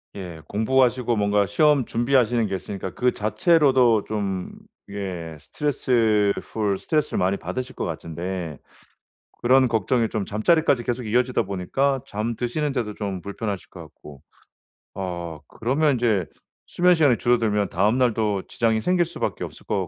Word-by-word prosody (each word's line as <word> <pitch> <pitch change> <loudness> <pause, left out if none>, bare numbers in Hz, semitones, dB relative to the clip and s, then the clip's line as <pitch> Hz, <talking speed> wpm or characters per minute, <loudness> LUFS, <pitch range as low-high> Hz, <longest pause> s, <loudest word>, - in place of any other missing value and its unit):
예, 90 -5 -8
공부하시고 125 +2 +2
뭔가 100 -1 +2
시험 145 - +3
준비하시는 120 -1 +2
게 95 - -2
있으니까 95 0 -6
그 125 0 +2
자체로도 125 - +3
좀 100 -4 -3 0.4
예, 90 -5 -5
스트레스 110 - +1
풀 105 -3 -2
스트레스를 150 -2 -1
많이 95 +2 +1
받으실 130 +4 -5
것 - - -3
같은데 85 0 -5 0.8
그런 130 +2 +5
걱정이 115 0 +1
좀 105 -3 -2
잠자리까지 130 - +2
계속 120 +1 -2
이어지다 125 +3 +1
보니까 125 +9 -1
잠 110 +3 -3
드시는 140 +6 -2
데도 110 -5 -3
좀 100 -3 -4
불편하실 100 -1 -5
것 - - -11
같고. 70 -3 -14 0.7
어 85 -4 -5
그러면 140 +5 +1
이제 110 -7 +1 0.4
수면 180 0 +3
시간이 145 -7 +4
줄어들면 110 -5 +1
다음 105 +7 +2
날도 110 -6 +1
지장이 110 -1 +1
생길 180 +3 +2
수밖에 170 - -4
없을 - - -13
것 95 -4 -1
110 Hz, 330 characters per minute, -23 LUFS, 100-130 Hz, 0.8 s, 그런